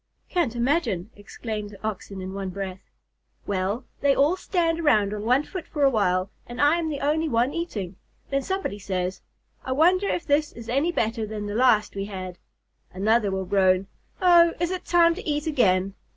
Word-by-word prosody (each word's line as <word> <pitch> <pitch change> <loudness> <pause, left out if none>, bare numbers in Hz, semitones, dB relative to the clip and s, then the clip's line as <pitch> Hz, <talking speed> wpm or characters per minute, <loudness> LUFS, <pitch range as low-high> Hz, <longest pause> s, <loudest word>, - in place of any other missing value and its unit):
"Can't 330 -11 0
imagine," 235 - 0
exclaimed 210 0 -6
the 200 -1 -14
Oxen 195 -2 -6
in 185 +1 -6
one 195 -1 -4
breath. 190 0 -5 0.7
"Well, 200 +5 -2
they 280 -1 +3
all 290 +6 +3
stand 340 -3 0
around 215 -11 +3
on 210 - -4
one 250 +5 +3
foot 365 +2 -7
for 295 -2 -2
a 275 - +5
while, 185 -3 +1 0.2
and 240 +1 -8
I 295 +4 +4
am 325 -2 -2
the 290 -2 -4
only 310 +3 +1
one 240 +2 +1
eating. 205 - -4 0.3
Then 275 0 +1
somebody 380 - -3
says, 185 -1 -3 0.4
'I 260 - -2
wonder 360 +7 +3
if 345 - -2
this 295 +1 +1
is 230 -1 -10
any 280 +8 +1
better 225 -7 -1
than 210 -1 -5
the 205 - -4
last 235 -2 +3
we 195 0 -3
had.' 185 -3 -7 0.5
Another 210 +3 +2
will 190 0 -2
groan, 185 0 +3 0.3
'Oh, 345 -2 +6
is 345 +1 0
it 370 - -4
time 340 -1 +4
to 405 0 -6
eat 295 +1 -1
again?' 195 - +2
235 Hz, 190 wpm, -25 LUFS, 195-310 Hz, 0.7 s, Oh